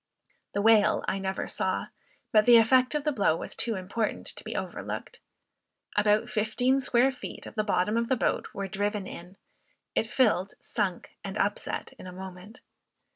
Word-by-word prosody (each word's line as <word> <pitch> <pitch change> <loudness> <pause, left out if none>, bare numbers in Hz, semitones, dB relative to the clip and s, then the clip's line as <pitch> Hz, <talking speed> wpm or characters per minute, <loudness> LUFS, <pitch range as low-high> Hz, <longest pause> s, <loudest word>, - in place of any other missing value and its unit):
The 200 - 0
whale 220 -1 +5
I 195 - 0
never 190 0 -3
saw, - - -1 0.4
but 215 -1 +5
the 240 -1 +9
effect 255 +4 +4
of 295 - 0
the 300 - +1
blow 200 - +2
was - - -6
too 230 -2 0
important 195 +4 -2
to - - -8
be - - -6
overlooked. - - -5 0.8
About 210 +1 +3
fifteen 245 +5 +1
square 255 +1 +3
feet 255 - -8
of - - -9
the 215 - 0
bottom 210 +1 +1
of 235 0 0
the 260 - +3
boat - - 0
were 195 0 -4
driven 205 +1 -2
in; 180 +1 -10 0.6
it 225 - +1
filled, 215 -5 +2
sunk, 200 -6 -3
and 195 +1 -5
upset 205 0 -2
in - - -9
a - - -7
moment. 190 +3 -10
210 Hz, 175 wpm, -28 LUFS, 195-235 Hz, 0.8 s, the